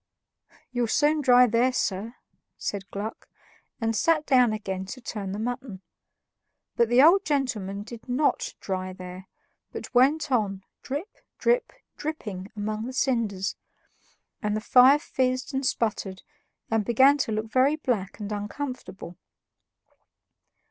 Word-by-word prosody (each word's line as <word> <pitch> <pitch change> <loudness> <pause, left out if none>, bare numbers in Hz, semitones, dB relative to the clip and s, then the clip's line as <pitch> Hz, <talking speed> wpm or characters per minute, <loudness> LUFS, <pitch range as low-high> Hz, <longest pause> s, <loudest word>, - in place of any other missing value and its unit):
"You'll 245 -2 0
soon 300 +6 +2
dry 250 -2 +6
there, 245 +2 +2
sir," 225 -1 -2 0.4
said 200 -1 -4
Gluck, 210 +3 -6 0.5
and 225 -1 0
sat 310 +5 +2
down 250 -4 +4
again 190 -3 -4
to 255 - -7
turn 210 -5 -5
the 200 - -4
mutton. 240 -3 -5 0.9
But 235 -1 +3
the 245 +3 +6
old 370 +6 +6
gentleman 215 - -1
did 235 +3 -11
NOT 270 +4 0
dry 185 -1 -3
there, 185 0 -9 0.4
but - - -8
went 280 +4 +3
on 200 -6 0 0.2
drip, 290 - -5 0.2
drip, 485 0 +1 0.3
dripping 210 -11 -5
among 215 +2 -3
the 260 - -6
cinders, 225 -8 0 0.9
and 210 -2 0
the - - -1
fire 255 +5 +6
fizzed 255 -1 -1
and 265 +1 -1
sputtered 210 -6 -1 0.5
and 225 -1 +2
began 265 +6 +5
to 240 - 0
look 215 +1 -3
very 265 +4 +4
black 230 -11 -2
and 205 0 -5
uncomfortable. 210 -4 -6
235 Hz, 135 wpm, -26 LUFS, 205-265 Hz, 0.9 s, dry